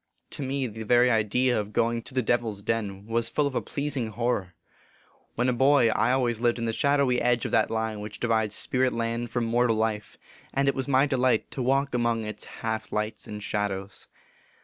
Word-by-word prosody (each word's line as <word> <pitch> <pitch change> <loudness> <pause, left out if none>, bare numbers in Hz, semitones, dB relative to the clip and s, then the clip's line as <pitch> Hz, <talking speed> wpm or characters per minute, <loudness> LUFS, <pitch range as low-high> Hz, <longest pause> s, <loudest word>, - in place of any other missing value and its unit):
To - - -5
me, 135 0 -1
the 110 -2 -6
very 120 +3 +4
idea 115 +3 +2
of 105 0 -5
going 115 0 +1
to 130 - -11
the 130 - +2
Devil 120 0 +1
s 100 -1 -8
Den 100 -3 -2
was 115 +1 -1
full 150 - +1
of 140 - -2
a - - 0
pleasing 140 -4 -3
horror. 110 -5 -2 0.8
When 125 +2 +1
a 125 - +2
boy, 135 -1 +4
I 120 - +2
always 120 -3 +1
lived 120 0 +2
in 115 - -2
the 115 - -1
shadowy 140 -2 +2
edge 120 -1 +2
of - - -3
that - - +3
line 110 -1 -2
which 105 0 -7
divides 110 -3 +1
spirit 130 0 +1
land 115 +1 -2
from 120 -2 -1
mortal 115 0 +2
life, 110 -1 -2 0.4
and 140 0 +2
it 140 - +3
was 130 0 -3
my 135 0 +4
delight 130 -5 +1
to 130 - -4
walk 135 +2 +1
among 120 -2 +1
its 105 - -6
half 110 -1 -4
lights 105 +1 -3
and 105 -1 -7
shadows. 100 -2 -3
115 Hz, 210 wpm, -26 LUFS, 110-130 Hz, 0.8 s, very